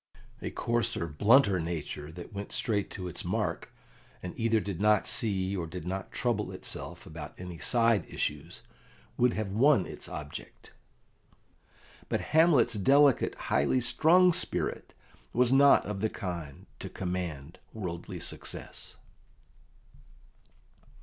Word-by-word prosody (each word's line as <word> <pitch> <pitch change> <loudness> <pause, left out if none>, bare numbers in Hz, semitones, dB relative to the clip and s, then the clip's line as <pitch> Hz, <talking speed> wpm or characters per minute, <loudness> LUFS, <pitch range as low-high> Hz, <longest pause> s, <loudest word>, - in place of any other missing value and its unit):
A - - -3
coarser, 120 -7 -1
blunter 100 - +4
nature 80 -2 -4
that 90 +5 -10
went 100 0 -6
straight 105 -3 -1
to 90 -2 -6
its 90 - -6
mark, - - -2 0.5
and 90 - -5
either 115 -1 +3
did 100 -3 -5
not 105 -1 +4
see, 95 -3 0
or 85 -3 -3
did 85 0 -7
not 95 +1 -4
trouble - - -1
itself, - - -6
about 80 -1 -9
any 90 -2 -7
side 115 +3 +2
issues, - - -4 0.5
would 125 0 +3
have 110 -3 -3
won 120 0 +4
its - - -8
object; - - -8 1.4
but - - +1
Hamlet's 155 -7 +5
delicate, 135 +6 +4
highly 70 - +1
strung 170 +9 +4
spirit - - -3 0.4
was 125 +1 +3
not 140 +1 +6
of 105 -1 -4
the 110 - +1
kind 85 -9 -6
to - - -6
command 85 -5 -5
worldly 90 -6 -6
success. - - -3
100 Hz, 125 wpm, -29 LUFS, 90-120 Hz, 1.4 s, not